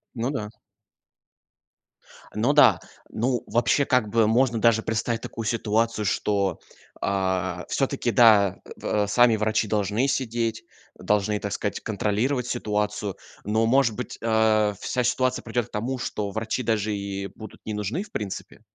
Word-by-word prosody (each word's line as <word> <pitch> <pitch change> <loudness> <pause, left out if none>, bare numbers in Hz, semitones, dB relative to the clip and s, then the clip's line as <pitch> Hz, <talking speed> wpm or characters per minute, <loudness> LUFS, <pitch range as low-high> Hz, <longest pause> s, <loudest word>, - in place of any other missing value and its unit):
Ну 120 +2 -1
да. 105 -7 -4 1.9
Ну 120 +7 +2
да. 145 - +6 0.3
Ну, 120 +1 -1
вообще, 120 +5 +2
как 125 -5 +2
бы, 115 0 +3
можно, 120 +1 +2
даже, 115 -1 +4
представить 115 +1 -1
такую 115 - -6
ситуацию, 110 0 0
что, 100 -2 0 0.4
а, 95 -2 -1
всё-таки, 135 -3 0
да, 105 -4 +5 0.2
э, 105 -1 0
сами 120 +2 +4
врачи 110 0 0
должны 105 +4 0
сидеть. 115 -4 -1 0.4
Должны, 105 0 +1
так 100 -1 -4
сказать, 105 - -2
контролировать 115 +5 -1
ситуацию, 105 -3 -2 0.3
но, 110 +2 +1
может 125 -2 +3
быть, 125 -1 -6
э, 110 -2 +3
вся 125 - -1
ситуация 130 +1 0
придёт 120 0 -2
к - - -31
тому, 120 +5 -2
что 105 -3 -3
врачи 110 +4 -2
даже 110 -2 0
и 100 -1 -4
будут 110 -2 -11
не 110 - -3
нужны 105 - -2
в 210 - -17
принципе? 105 +1 -6
110 Hz, 145 wpm, -25 LUFS, 105-120 Hz, 1.9 s, да